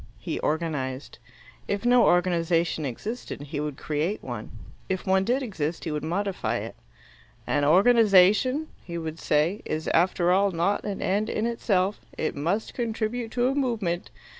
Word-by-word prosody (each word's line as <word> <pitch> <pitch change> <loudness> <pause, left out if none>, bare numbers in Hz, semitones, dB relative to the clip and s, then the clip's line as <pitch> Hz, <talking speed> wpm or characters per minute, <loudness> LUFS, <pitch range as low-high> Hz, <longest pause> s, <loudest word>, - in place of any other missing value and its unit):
He - - -4
organized. 150 -4 -3 0.5
If 200 +3 -2
no 245 0 +5
organization 170 -3 +2
existed, 210 - -6
he 145 +1 -5
would 150 -2 -3
create 160 +8 -2
one. 120 -4 -6 0.4
If 190 -1 -2
one 190 0 +3
did 250 +6 0
exist, 175 - -3
he 160 - -3
would 150 -1 -3
modify 175 - -1
it. 110 +1 -6 0.7
"An 145 -1 +1
organization," 215 - +5
he 170 -1 -6
would 160 -1 -5
say, 155 +7 +1
"is 155 +1 -3
after 175 +1 +2
all 200 +2 +4
not 180 +3 0
an 200 -2 -3
end 210 +3 0
in 215 - -1
itself. 205 -4 0 0.2
It 155 - -2
must 175 +10 -1
contribute 230 0 -2
to 245 0 +2
a 265 - +1
movement." 225 -11 -1
180 Hz, 155 wpm, -26 LUFS, 155-215 Hz, 0.7 s, no